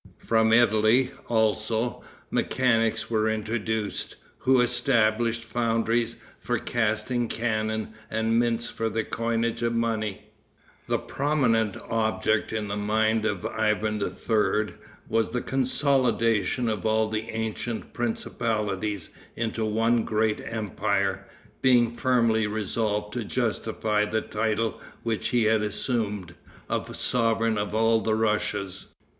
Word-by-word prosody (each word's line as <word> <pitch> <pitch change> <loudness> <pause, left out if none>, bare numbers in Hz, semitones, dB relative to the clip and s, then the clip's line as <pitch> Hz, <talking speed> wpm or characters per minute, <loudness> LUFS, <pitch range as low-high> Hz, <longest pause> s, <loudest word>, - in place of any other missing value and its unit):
From 110 -1 +2
Italy, 115 +2 +4 0.2
also, 110 +1 0 0.3
mechanics 115 -3 +1
were 110 -1 +2
introduced, 110 -1 -2 0.2
who 130 0 +4
established 115 -1 +2
foundries 115 0 0 0.2
for - - -1
casting 120 +2 0
cannon, 110 -1 -1 0.2
and 110 +1 +1
mints 120 0 0
for 115 0 -2
the 110 +1 -1
coinage 115 +1 -1
of 115 0 0
money. 110 -3 -2 0.6
The - - +2
prominent 125 -8 +1
object 110 -1 0
in 110 -1 -2
the 100 - -3
mind 110 +1 +1
of 100 -4 -3
Ivan 105 -1 0
III. 105 0 0 0.3
was 115 0 +1
the 125 - -1
consolidation 125 -4 +1
of 105 -4 -1
all 110 0 +2
the 110 +1 -3
ancient 110 0 -4
principalities 105 -4 -2 0.3
into 115 -1 -2
one 115 +2 +2
great 110 0 0
empire, 100 -3 -1 0.3
being 120 -3 +4
firmly 115 -4 +2
resolved 105 0 -2
to 120 - -2
justify 110 -2 0
the 110 +1 -1
title 110 0 -1 0.2
which 115 -2 -1
he 120 -2 +2
had 110 0 +3
assumed, 105 -4 -2 0.3
of - - -3
Sovereign 115 -2 +1
of 105 +1 -2
all 115 0 +3
the 110 0 +1
Russias. 105 -3 -1
110 Hz, 115 wpm, -26 LUFS, 110-115 Hz, 0.6 s, Italy